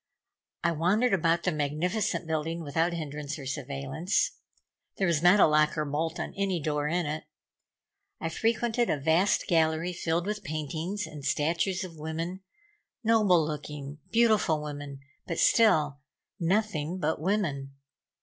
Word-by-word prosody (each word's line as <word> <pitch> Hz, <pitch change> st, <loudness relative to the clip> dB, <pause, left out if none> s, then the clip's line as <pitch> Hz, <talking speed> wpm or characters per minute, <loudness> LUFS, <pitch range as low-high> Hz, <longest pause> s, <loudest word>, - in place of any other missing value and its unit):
I 170 Hz, -, +3 dB
wandered 195 Hz, +9 st, +2 dB
about 170 Hz, -2 st, +2 dB
the 180 Hz, -, +1 dB
magnificent 160 Hz, +8 st, -1 dB
building 160 Hz, +1 st, -2 dB
without 160 Hz, +4 st, 0 dB
hindrance 150 Hz, -2 st, -5 dB
or 140 Hz, -, -8 dB
surveillance. 140 Hz, -, -1 dB, 0.7 s
There 195 Hz, -, +1 dB
was 170 Hz, -4 st, +2 dB
not 180 Hz, +4 st, +6 dB
a -, -, +8 dB
lock 155 Hz, 0 st, +3 dB
or 150 Hz, -, 0 dB
bolt 160 Hz, +3 st, -2 dB
on -, -, -4 dB
any 195 Hz, -3 st, 0 dB
door 150 Hz, -1 st, -1 dB
in 175 Hz, +2 st, 0 dB
it. 155 Hz, +1 st, -4 dB, 0.9 s
I 165 Hz, -, -2 dB
frequented 230 Hz, +5 st, 0 dB
a -, -, +1 dB
vast 160 Hz, +7 st, +2 dB
gallery 165 Hz, +1 st, +1 dB
filled 170 Hz, 0 st, -1 dB
with 210 Hz, +1 st, -3 dB
paintings 155 Hz, +7 st, -3 dB
and 150 Hz, -2 st, -9 dB
statues 165 Hz, +7 st, 0 dB
of 165 Hz, -4 st, -9 dB
women, 165 Hz, +4 st, -4 dB, 0.6 s
noble 210 Hz, -7 st, +4 dB
looking, 150 Hz, -1 st, -6 dB
beautiful 215 Hz, -10 st, +3 dB
women, 145 Hz, -2 st, -7 dB, 0.3 s
but 170 Hz, -, -3 dB
still 155 Hz, -11 st, +4 dB, 0.4 s
nothing 180 Hz, -3 st, 0 dB
but 160 Hz, -4 st, -1 dB
women. 155 Hz, -8 st, -1 dB
165 Hz, 140 wpm, -28 LUFS, 150-185 Hz, 0.9 s, a